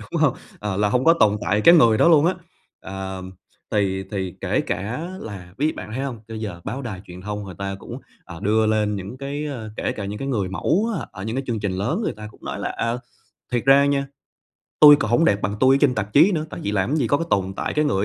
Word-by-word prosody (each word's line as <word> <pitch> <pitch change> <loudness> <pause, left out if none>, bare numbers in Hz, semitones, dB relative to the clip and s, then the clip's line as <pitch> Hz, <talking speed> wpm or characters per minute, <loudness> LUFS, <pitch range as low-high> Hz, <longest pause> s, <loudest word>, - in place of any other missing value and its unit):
đúng - - -4
hông? - - +3 0.2
Ờ, 105 -2 -3
là 105 +1 +2
hông 125 +5 +1
có 165 - +7
tồn 105 -9 +3
tại 100 +5 +1
cái 170 +9 +8
người 115 -9 +5
đó - - +5
luôn 160 -2 +5
á, 185 - +2 0.5
ờ, 95 -1 -6 0.5
thì 95 -2 0
thì 95 -3 -3
kể - - 0
cả 125 - -3
là 95 -4 -9
ví 155 +3 +1
bạn - - -8
có 110 - -7
thấy 135 +2 -2
hông, 120 -5 -5
cho 110 - -7
giờ 105 -6 -5
báo 135 +2 -4
đài 105 -7 -6
truyền 90 0 -10
thông 105 0 -4
người 95 -3 -9
ta 100 0 -3
cũng, - - -8 0.3
ờ, 85 -1 -10
đưa 110 +1 +2
lên 105 -1 +1
những 100 +6 -7
cái, 140 +2 -4
ờ, 120 -7 -6
kể - - -1
cả 100 - -6
những 105 +2 -5
cái 135 - -4
người 100 -8 -1
mẫu 165 - 0
á - - -6
ở 95 - -8
những 110 +3 -3
cái 135 - -1
chương 115 -4 -2
trình 100 -3 -1
lớn 115 - -1
người - - -2
ta 110 - -8
cũng - - -19
nói - - -4
là - - -2
"À, 115 +1 -2 0.6
thiệt 120 -1 -1
ra 140 +1 +6
nha, 140 -1 0 0.7
tui 145 -1 +10
còn 120 -6 -2
hổng 165 +8 +4
đẹp 100 -6 +2
bằng 100 +3 -1
tui 130 +1 +5
ở - - +4
trên 130 -4 +4
tạp 105 -1 -3
chí 170 +8 +6
nữa, 155 -3 -1
tại - - -7
vì 100 - -1
làm 100 +1 0
cái 155 - +1
gì 125 - +1
có 145 - +3
cái 165 - -3
tồn 95 -1 0
tại - - -3
cái 150 0 +2
người 100 -8 +1
110 Hz, 275 wpm, -22 LUFS, 100-140 Hz, 0.7 s, tui